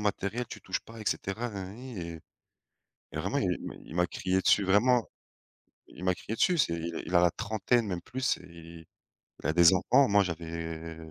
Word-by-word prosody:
matériel, 105 +3 -1
tu - - -9
touches - - -2
pas 115 0 -12
et - - -7
cetera, 110 +5 -1
na 100 -3 -5
na 95 - -8
ni» 120 -1 -8
et 85 -1 -6 0.9
et - - -5
vraiment, - - -1
il - - +1 0.4
il 80 - -10
m'a 90 0 +3
crié 95 +1 0
dessus, 100 - +4
vraiment, 115 +5 +4 0.8
il 90 - -10
m'a 90 0 +3
crié 105 +5 -6
dessus, 180 +8 +3
c'est 85 - +2
il 85 +2 -5
a 85 - +7
la 90 - +5
trentaine 110 +3 0
même 90 -3 -3
plus 130 +6 -1
et 85 -2 -12 0.6
il - - -13
a 80 - +2
des 85 +1 +7
enfants, 130 +9 +4
moi 100 0 +5
j'avais 80 -2 -4
95 Hz, 195 wpm, -29 LUFS, 85-110 Hz, 0.9 s, a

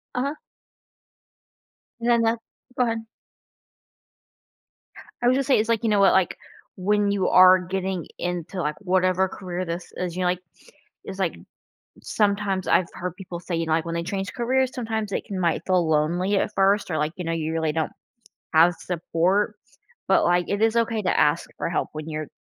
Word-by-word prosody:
Uh-huh. 275 +4 -1 1.6
And 235 - -1
then 235 -1 +4
that 225 +1 +1 0.4
go 250 - +4
ahead. 230 -1 -1 2.2
I 240 - +2
would 250 - +4
just 275 -1 0
say 270 - +4
it's 220 +1 -1
like, 230 0 +1
you 225 - +2
know 210 -1 +3
what? 195 - +6
Like, 190 -2 +2 0.4
when 205 +2 +1
you 200 -2 +1
are 185 0 +8
getting 185 -1 -3
into, 175 +1 -3
like, 150 -1 -1
whatever 185 0 +2
career 185 -1 -5
this 170 +1 -5
is, 180 -2 -3
you 185 - -3
know, 180 - +2
like 180 0 0 0.7
it's - - -7
like - - 0 0.7
sometimes 200 -2 0
I've 185 - +4
heard 180 -1 -5
people 180 -3 -7
say, 175 -1 -4
you 165 - -1
know, 160 - -3
like, 160 +1 +1
when 170 0 -3
they 170 - -1
change 195 +2 -4
careers, 260 +1 +1
sometimes 220 -4 -3
it - - -2
can 195 -2 -5
might 170 -2 +1
feel 180 -3 +2
lonely 175 +6 +1
at - - -1
first 195 0 +2
or, 155 - 0
like, 150 +1 -1
you 180 - -4
know, 165 - -1
you 160 -1 -2
really 160 -1 0
don't 160 0 -1 0.6
have 170 +2 +5
support, 180 +5 0 0.5
but, - - +4
like, 175 0 +2
it 200 +1 -1
is 225 0 +3
okay 230 -1 +1
to 185 - +1
ask 150 +3 +2
for - - -2
help 170 - -1
when 155 0 -6
you're, 155 -1 -4
185 Hz, 190 wpm, -24 LUFS, 170-210 Hz, 2.2 s, are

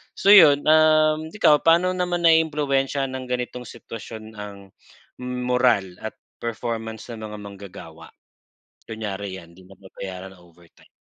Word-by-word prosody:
so - - -4
yun, 155 -8 +8
uhm, 155 0 +3
ikaw 150 -8 +4
paano 170 +3 +4
naman 180 -1 -2
naiimpluwensiyahan 145 -4 +2
ng 130 -1 -6
ganitong 125 0 -4
sitwasyon 110 -1 -10
ang 105 -1 -8 0.7
moral 125 -7 0
at 110 - -7 0.2
performance 115 0 -5
ng 110 -1 -8
mga 105 0 -8
manggagawa? 95 -5 -11 0.8
Kunyari 100 -3 -5
'yan, 85 -2 -14
hindi 95 - -17
nababayaran 95 0 -10
ang 90 - -20
overtime. 85 0 -23
120 Hz, 125 wpm, -23 LUFS, 100-150 Hz, 0.8 s, yun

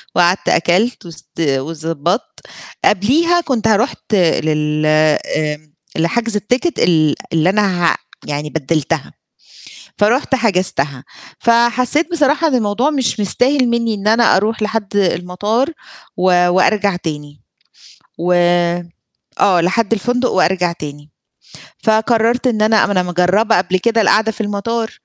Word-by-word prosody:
وقعدت 175 +2 +2
أكلت 185 +6 +1
وست 165 0 -13
وضبطت، 160 - -2 0.5
قبليها 320 - +2
كنت 235 -8 -1
ه 220 - +4
رُحت 225 -1 -2
لل 155 -3 0
آآ 155 0 +1 0.4
لحجز 225 +7 0
التيكت 245 - -1
ال 155 -4 +2 0.2
اللي 165 +2 +2
أنا 190 -4 +1
ه - - -7 0.3
يعني 150 +1 -4
بدلتها. 155 0 -2 0.9
فرحت 245 +6 +1
حجزتها 180 - -1 0.3
فحسيت 240 +7 +2
بصراحة 305 +1 +2
إن 270 - -1
الموضوع 235 +5 0
مش 265 -6 -1
مستاهل 255 +6 +1
مني 235 -2 0
إن 205 +1 -3
أنا 230 -1 +4
أروح 215 +3 -1
لحد 210 -2 -3
المطار 200 - 0 0.5
و 180 -1 +3
وأرجع 195 +1 +2
تاني، 150 -4 -7 0.8
و 175 +1 -1 1.1
آه 185 -4 +4
لحد 200 +5 0
الفندق 245 +4 0
وأرجع 180 -2 +1
تاني 145 -2 -9 0.7
فقررت 225 +3 +1
إن 220 -3 0
أنا 215 0 +3
ما - - -3
أنا 185 -2 +1
مجربة 180 +5 +1
قبل 185 +1 0
كده 230 +3 +1
القعدة 220 +1 +2
في 220 - -7
المطار، 220 +2 -3
200 Hz, 125 wpm, -16 LUFS, 170-230 Hz, 1.1 s, ه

